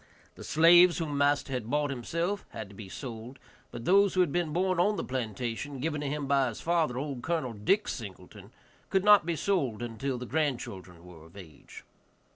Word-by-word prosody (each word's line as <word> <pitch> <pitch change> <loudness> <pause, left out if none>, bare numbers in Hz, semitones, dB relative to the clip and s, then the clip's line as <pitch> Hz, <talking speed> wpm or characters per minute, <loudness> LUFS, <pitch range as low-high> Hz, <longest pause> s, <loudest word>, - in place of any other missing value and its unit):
The - - -12
slaves 170 +2 +6
whom 155 -4 -3
master 145 -1 +1
had 120 -3 -4
bought 145 0 0
himself 170 - -3
had 110 -3 -8
to 100 - -14
be 100 -2 -10
sold, 120 +2 -8 0.3
but 120 0 -8
those 200 +1 +4
who 185 - +4
had 175 -5 +1
been 175 -2 -1
born 185 +2 0
on 205 +4 +3
the - - -3
plantation, 125 +2 -4
given 150 +1 -2
to 145 - -3
him 145 0 -3
by 135 -1 +2
his 115 - -6
father, 165 -7 0
old 135 -2 -4
Col. 155 -5 -2
Dick 195 - +1
Singleton, - - -8 0.4
could 190 -1 +1
not 205 -5 +6
be 170 - 0
sold 140 - -1
until 125 +3 -3
the 125 - -6
grandchildren 120 - -3
were 85 -3 -13
of 85 - -17
age. 80 -7 -13
140 Hz, 195 wpm, -29 LUFS, 120-170 Hz, 0.4 s, slaves